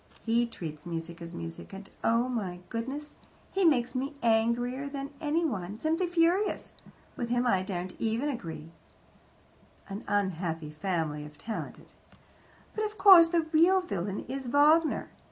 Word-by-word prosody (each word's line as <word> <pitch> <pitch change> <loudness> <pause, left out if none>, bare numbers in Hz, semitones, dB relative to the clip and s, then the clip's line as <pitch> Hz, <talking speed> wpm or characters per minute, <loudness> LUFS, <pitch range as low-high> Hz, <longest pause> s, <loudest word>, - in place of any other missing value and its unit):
He 235 +1 +2
treats 155 -9 -7
music 170 0 -6
as 170 0 -7
music, 165 +3 -7
and 195 0 -8 0.2
oh, 230 +2 +3
my 195 -8 -3
goodness! 270 +6 -5 0.4
He 385 - +1
makes 250 -7 +3
me 275 +3 -3
angrier 240 +4 +1
than 280 0 -5
anyone, 290 - -1
simply 320 +7 0
furious. 350 +4 +1 0.4
With 240 - -3
him 245 +1 +1
I 195 -6 +3
daren't 185 -1 -4
even 230 +5 0
argue." 165 - -5 1.2
An 200 +3 -6
unhappy 170 -6 -1
family, 155 -3 -2
if 150 0 -12
talented. 220 +6 -7 0.8
"But, 435 - -2
of 425 0 -3
course, 375 -4 +9
the 335 0 +2
real 350 +4 +6
villain 200 - -4
is 265 0 -4
Wagner. 300 +5 +3
235 Hz, 140 wpm, -29 LUFS, 180-295 Hz, 1.2 s, course